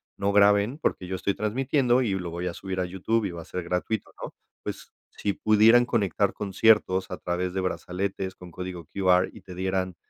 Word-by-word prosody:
no 100 +1 0
graben, 100 +5 +4
porque 95 - -2
yo 95 - -3
estoy 100 +2 -1
transmitiendo 125 +4 +1
y 110 - 0
lo 90 -2 -3
voy 85 +2 -4
a 90 - -2
subir 95 0 -5
a 90 - 0
YouTube 95 +5 -1
y 95 - -2
va 85 -1 -7
a - - -12
ser 90 - -5
gratuito, 90 +5 -2
¿no? - - -7 0.3
Pues, - - -7 0.2
si 100 - -2
pudieran 110 +4 +5
conectar 100 -8 +1
conciertos 100 -2 +2
a 90 - -5
través 90 +1 -2
de 95 - 0
brazaletes 95 +1 -3
con 90 -1 -12
código 90 -1 -7
QR 95 +1 +2
y - - -12
te 90 - -11
dieran 95 0 -1
95 Hz, 200 wpm, -26 LUFS, 90-105 Hz, 0.3 s, pudieran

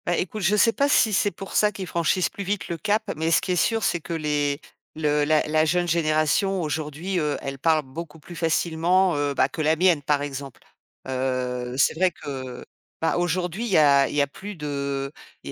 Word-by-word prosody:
Bah 175 -1 +1
écoute, 210 +4 -3
je 195 +3 +3
sais 230 +2 +5
pas 280 +4 +1
si 220 -6 +4
c'est 205 - +3
pour 195 +1 -9
ça 210 0 +3
qu'ils 195 -2 -6
franchissent 170 +1 +1
plus 200 - -6
vite 200 +1 -3
le 170 - -3
cap, 215 +4 0
mais 160 +2 -1
ce 165 - +4
qui - - -3
est - - +2
sûr, 225 +5 +1
c'est 175 - +1
que 170 - -6
les 150 -2 0 0.4
le 150 -1 +1
la 155 0 +3
la 155 +1 +3
jeune 175 +3 +1
génération 165 +4 +1
aujourd'hui, 155 +4 -3
heu, 150 -2 -1
elle 135 0 -5
parle 155 +1 +2
beaucoup 165 +5 -8
plus 175 +3 -12
facilement, 170 +2 +2
heu, 145 -1 -1
bah, - - +3
que 160 - -5
la 155 +1 +3
mienne 175 -2 +3
par 145 0 0
exemple, 140 -2 -7 0.5
heu, 125 -1 -2
c'est - - +3
vrai 185 +3 +2
que, 130 -6 -7 0.3
bah, 165 - +1
aujourd'hui, 175 +4 -1
il - - -3
y - - +5
a 140 -3 +5
il - - -6
y 145 - +3
a - - -2
plus 200 +8 -9
de 140 -3 -3 0.3
i - - -7
160 Hz, 220 wpm, -24 LUFS, 145-180 Hz, 0.5 s, sais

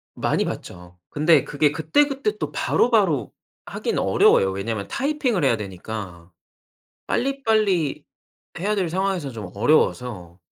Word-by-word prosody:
많이 - - 0
받죠. 90 0 -8
근데 155 0 +3
그게 145 0 +1
그때그때 275 - 0
또 - - -4
바로바로 200 - +1 0.3
하기는 - - -3
어려워요. 95 - +4
왜냐면 100 +2 -4
타이핑을 275 - -1
해야 130 -4 +3
되니까 95 -3 -8 0.8
빨리빨리 220 - 0 0.6
해야 205 +4 0
될 185 -5 -1
상황에서 185 -4 -1
좀 105 -7 -8
어려워서. 105 - 0
150 Hz, 295 characters per minute, -23 LUFS, -, 0.8 s, 어려워요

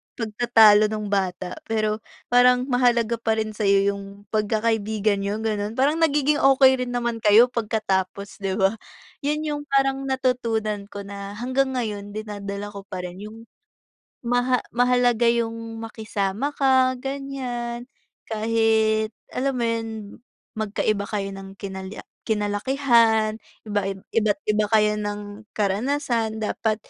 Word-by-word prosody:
Pagtatalo 220 -2 +5
nung 210 -1 -4
bata 185 -2 -2
pero 215 -1 0 0.3
parang 250 0 +5
mahalaga 235 -2 +2
pa 225 -1 +1
rin 220 -1 -2
sa'yo 200 -2 +2
yung 200 0 -9
pagkakaibigan 215 -1 0
niyo 200 +1 -2
gano'n, 210 0 -2
parang 290 +5 +2
nagiging 295 -1 +2
okey 265 -1 +5
rin - - -5
naman 235 -1 -1
kayo 220 +4 +6
pagkatapos, 200 -4 -2
'di 195 -1 -2
ba? 200 +2 +1 0.4
'Yon 300 +2 -1
yung 295 -1 -2
parang 270 0 +1
natutunan 230 -6 -1
ko 205 -1 -8
na 200 0 -7
hanggang 260 +3 0
ngayon 205 -3 -4
dinadala 205 -1 -5
ko 200 -1 -10
pa 185 -2 -5
rin 180 +1 -7
yung 225 +1 -12 0.8
maha 245 +1 +1
mahalaga 245 -1 +3
yung 230 -1 -1
makisama 220 +3 -3
ka 260 -2 +4
gan'yan, 255 -3 -4 0.4
kahit 220 0 +2 0.2
alam 270 +1 -1
mo 240 - 0
'yon, 230 0 -1 0.7
magkaiba 210 -1 0
kayo 200 -2 -2
ng 195 0 -10
kinal 190 -1 -6 0.4
kinalakihan, 220 +1 +2 0.3
iba 205 -1 0 0.3
iba't 215 +2 +2
iba 210 0 +1
kayo 210 -1 +4
ng 205 +1 -6
karanasan, 225 +2 0
dapat 215 0 -1
220 Hz, 125 wpm, -23 LUFS, 205-245 Hz, 0.8 s, kayo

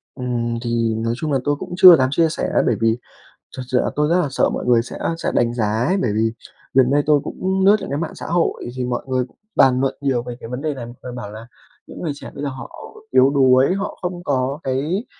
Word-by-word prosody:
Ừm, 120 -2 -2
thì 115 -1 0
nói 115 +1 -1
chung 150 +3 -3
là 135 - +2
tôi 145 0 +1
cũng 160 - -8
chưa 185 -2 +10
dám 130 -3 +2
chia 165 +3 +2
sẻ 155 - -3
á, - - +3
bởi 120 - +2
vì 115 0 +2 0.6
thật 130 - -4
sự 125 - 0
là - - 0
tôi 150 +1 +1
rất 175 +2 +3
là 150 - -1
sợ - - +2
mọi - - -4
người 120 -2 +4
sẽ 120 - -8 0.2
sẽ - - -2
đánh 120 0 +1
giá 105 -3 0
ấy, 190 - +1
bởi 120 - 0
vì 110 +1 +1 0.4
gần 130 -1 +4
đây 145 +1 +3
tôi 150 -1 +4
cũng 190 +1 -1
lướt 205 - +7
những - - -7
cái 140 - -2
mạng 165 -1 -4
xã - - -8
hội 170 0 0
thì 130 -1 -2
mọi 125 -1 -3
người 130 -1 0
cũng - - -29 0.2
bàn 130 -1 +4
luận 135 0 0
nhiều 130 -4 0
về 120 0 -7
cái 115 - -9
vấn 125 +2 -5
đề 155 0 -1
này. 130 -4 -7
Mọi 120 - -10
người 125 - -6
bảo 115 -4 -7
là 110 +2 -10 0.4
những - - -10
người 165 - -2
trẻ - - -10
bây 140 - -6
giờ 145 - -1
họ 130 0 -8 0.4
yếu 130 +1 +5
đuối, 135 +1 +4
họ 195 +1 -4
không 180 -1 -4
có 135 -1 -1
cái 150 - -1
130 Hz, 270 wpm, -20 LUFS, 120-150 Hz, 0.6 s, chưa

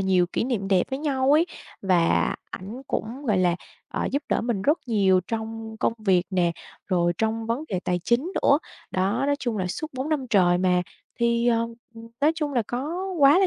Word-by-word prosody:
nhiều 185 -2 +3
kỷ 205 - -1
niệm 225 -7 -1
đẹp 190 -2 +3
với 265 - -2
nhau 275 -2 +1
ấy, 325 +3 +5 0.4
và 180 -3 +3 0.2
ảnh 215 +8 -7
cũng, 255 +6 -4
gọi 210 -4 +3
là, 175 -2 +3 0.3
ờ, - - -2
giúp 280 - 0
đỡ - - +2
mình 230 -5 -1
rất 300 +7 +3
nhiều 195 -5 +3
trong 225 0 -4
công - - +2
việc 190 -4 +2
nè, 175 -2 +2 0.3
rồi 175 -2 +2
trong 225 0 -1
vấn 235 +7 -1
đề 185 -3 -1
tài 180 0 0
chính 260 +10 +1
nữa. 280 - +5 0.3
Đó, 200 +8 0
nói 285 - +2
chung 235 -6 -2
là 185 - -1
suốt 180 - -3
4 260 +3 -3
năm 295 -5 0
trời 175 -3 +4
mà, 180 -1 +3 0.4
thì, 235 0 +2
ờ, 230 -1 +2 0.3
ừm, 230 0 -11
nói 300 +3 +4
chung 300 -3 -2
là 240 - +3
có 310 +10 -3
quá 285 +4 +7
là 390 - +4
225 Hz, 210 wpm, -25 LUFS, 190-270 Hz, 0.4 s, quá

